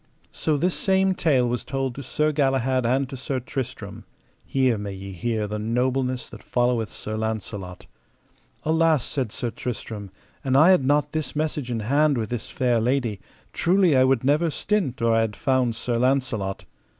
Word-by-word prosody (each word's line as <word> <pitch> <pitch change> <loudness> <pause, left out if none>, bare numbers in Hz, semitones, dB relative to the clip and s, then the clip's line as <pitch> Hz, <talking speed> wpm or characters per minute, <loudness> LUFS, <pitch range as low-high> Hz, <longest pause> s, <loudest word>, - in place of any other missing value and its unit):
So 155 -2 0
this 175 +5 +1
same 190 0 +2
tale 140 -9 +2
was 120 0 -2
told 135 -1 -2
to 140 - -7
Sir 150 +4 0
Galahad 135 -3 +1
and 135 +2 +1
to 135 - -6
Sir 130 +1 -3
Tristram:—here 130 0 -3
may 100 -1 -5
ye 95 0 -8
hear 110 +3 -2
the 105 +1 -4
nobleness 125 +3 0
that - - -10
followeth 120 -3 0
Sir 110 - -5
Launcelot. 105 -4 -4 0.8
Alas, 160 -3 +3
said 130 -7 -2
Sir 120 0 -3
Tristram, 110 -5 -5 0.3
an 130 -1 +1
I 160 +7 +7
had 180 -7 +4
not 145 +2 +2
this 155 -3 -3
message 150 -4 -2
in 115 -2 -2
hand 140 +5 +2
with 110 -1 -3
this 120 -3 -4
fair 125 -4 +1
lady, 120 -4 0 0.3
truly 180 -3 +3
I 130 - +6
would 130 -2 +2
never 150 +5 +3
stint 155 - -1
or 115 -1 +4
I 115 - +4
had 110 -2 -1
found 130 -4 +1
Sir 120 +1 -2
Launcelot. 120 -5 0
130 Hz, 175 wpm, -24 LUFS, 115-145 Hz, 0.8 s, I